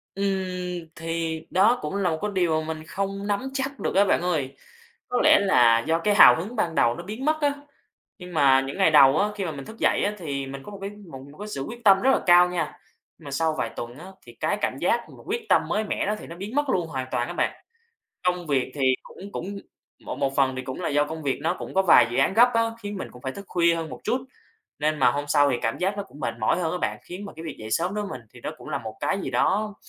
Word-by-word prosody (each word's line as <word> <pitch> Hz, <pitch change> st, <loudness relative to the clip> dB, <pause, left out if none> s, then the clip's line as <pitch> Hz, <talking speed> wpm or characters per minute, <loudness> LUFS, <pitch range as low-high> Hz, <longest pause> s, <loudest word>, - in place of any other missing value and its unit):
Ừm, 180 Hz, -3 st, -2 dB
thì 165 Hz, -1 st, -3 dB
đó 215 Hz, +7 st, +4 dB
cũng 150 Hz, +5 st, -4 dB
là 195 Hz, -3 st, +1 dB
một 160 Hz, -, -1 dB
cái 210 Hz, 0 st, -2 dB
điều 170 Hz, -4 st, +1 dB
mình 155 Hz, 0 st, -5 dB
không 195 Hz, +4 st, -4 dB
nắm 210 Hz, +6 st, -1 dB
chắc 270 Hz, 0 st, -3 dB
được -, -, -2 dB
á, 200 Hz, +1 st, +5 dB
bạn 185 Hz, -, +2 dB
ơi. 155 Hz, -7 st, -1 dB, 0.5 s
Có 250 Hz, -, +1 dB
lẽ -, -, +7 dB
là 120 Hz, -13 st, +5 dB
do 165 Hz, +1 st, +2 dB
cái 205 Hz, +4 st, +1 dB
hào -, -, +9 dB
hứng 205 Hz, +9 st, -5 dB
ban 170 Hz, -6 st, -1 dB
đầu 120 Hz, 0 st, +3 dB
nó 170 Hz, -, -7 dB
biến 220 Hz, +8 st, -6 dB
mất 310 Hz, +1 st, +1 dB
á. 285 Hz, -1 st, +2 dB, 0.7 s
Nhưng 180 Hz, -1 st, -10 dB
mà 135 Hz, -3 st, +5 dB
những 135 Hz, +6 st, -6 dB
ngày 190 Hz, -5 st, +4 dB
đầu 140 Hz, -1 st, +7 dB
á, 205 Hz, -, +2 dB
khi 200 Hz, -2 st, -3 dB
mà 165 Hz, -, -2 dB
mình 140 Hz, -2 st, -8 dB
thức 225 Hz, -, -11 dB
dậy -, -, +2 dB
á, 205 Hz, -, 0 dB
thì 140 Hz, -6 st, -4 dB
mình 135 Hz, 0 st, -8 dB
có 210 Hz, -, -10 dB
một 200 Hz, -, -8 dB
cái 195 Hz, -, -4 dB, 0.2 s
một 135 Hz, -, -8 dB, 0.2 s
cái 210 Hz, -, -6 dB
sự 140 Hz, -10 st, -5 dB
quyết 235 Hz, +1 st, -9 dB
tâm 195 Hz, -2 st, +6 dB
rất 265 Hz, -, +4 dB
là -, -, +3 dB
cao 175 Hz, 0 st, +7 dB
nha. 165 Hz, -4 st, -3 dB, 0.4 s
Mà 145 Hz, -4 st, -10 dB
sau 160 Hz, +2 st, 0 dB
vài -, -, -1 dB
tuần 120 Hz, +2 st, -7 dB
á, 170 Hz, -, -10 dB, 0.2 s
thì -, -, -13 dB
cái -, -, 0 dB
cảm -, -, -1 dB
giác -, -, +2 dB
mà -, -, -14 dB
quyết 470 Hz, -2 st, -3 dB
tâm -, -, +5 dB
mới 215 Hz, +1 st, 0 dB
mẻ 205 Hz, -, -2 dB
đó 210 Hz, -, 0 dB
thì -, -, -10 dB
nó 170 Hz, -, -9 dB
biến 205 Hz, +8 st, -7 dB
mất 290 Hz, -1 st, +1 dB
luôn 175 Hz, -8 st, 0 dB
hoàn 130 Hz, -4 st, -4 dB
toàn 120 Hz, 0 st, 0 dB
á -, -, -5 dB
bạn. -, -, 0 dB, 0.7 s
Công 180 Hz, -1 st, 0 dB
việc 135 Hz, -3 st, 0 dB
thì 140 Hz, -, -4 dB, 0.2 s
cũng 200 Hz, +2 st, -12 dB
cũng 200 Hz, +1 st, -5 dB, 0.5 s
một -, -, -5 dB
một 135 Hz, 0 st, -1 dB
phần 130 Hz, -2 st, +2 dB
thì 130 Hz, -, -3 dB
cũng 130 Hz, +6 st, -6 dB
là -, -, -1 dB
do 145 Hz, +1 st, +2 dB
công 160 Hz, +1 st, -7 dB
việc 135 Hz, -3 st, -1 dB
nó 170 Hz, +2 st, +1 dB
cũng -, -, -8 dB
có 190 Hz, -, +4 dB
vài 125 Hz, -10 st, +7 dB
dự 120 Hz, -, -2 dB
án 135 Hz, +8 st, +3 dB
gấp 240 Hz, +2 st, +7 dB
á, 230 Hz, -, +4 dB, 0.2 s
khiến 205 Hz, 0 st, -5 dB
mình -, -, -5 dB
cũng 125 Hz, -, -15 dB
phải 130 Hz, -, -3 dB
thức 200 Hz, -, -9 dB
khuya 170 Hz, -1 st, +3 dB
hơn 165 Hz, -1 st, -4 dB
một -, -, -8 dB
chút. 255 Hz, +1 st, 0 dB, 0.6 s
Nên 155 Hz, +1 st, 0 dB
mà 125 Hz, -3 st, +5 dB
hôm 145 Hz, +4 st, -2 dB
sau 145 Hz, -1 st, +4 dB
thì 125 Hz, -, +1 dB
cảm 115 Hz, -, -1 dB
giác 195 Hz, +3 st, 0 dB
nó 200 Hz, -, -2 dB
cũng 150 Hz, -7 st, -15 dB
mệt -, -, -2 dB
mỏi 140 Hz, +11 st, +1 dB
hơn 160 Hz, -2 st, -1 dB
á 180 Hz, -, -2 dB
bạn, -, -, -2 dB
khiến 185 Hz, +3 st, -8 dB
mà -, -, -9 dB
cái 160 Hz, -, -8 dB
việc 160 Hz, -, -6 dB
dậy 110 Hz, 0 st, -8 dB
sớm 175 Hz, -, 0 dB
đối 210 Hz, 0 st, -2 dB
với 195 Hz, -10 st, -6 dB
mình 115 Hz, -, -19 dB
thì -, -, -13 dB
nó -, -, -3 dB
cũng -, -, -11 dB
là -, -, -2 dB
một 110 Hz, -1 st, -8 dB
cái 195 Hz, -, 0 dB
gì -, -, -4 dB
đó 210 Hz, +1 st, +1 dB
175 Hz, 285 wpm, -25 LUFS, 145-200 Hz, 0.7 s, hào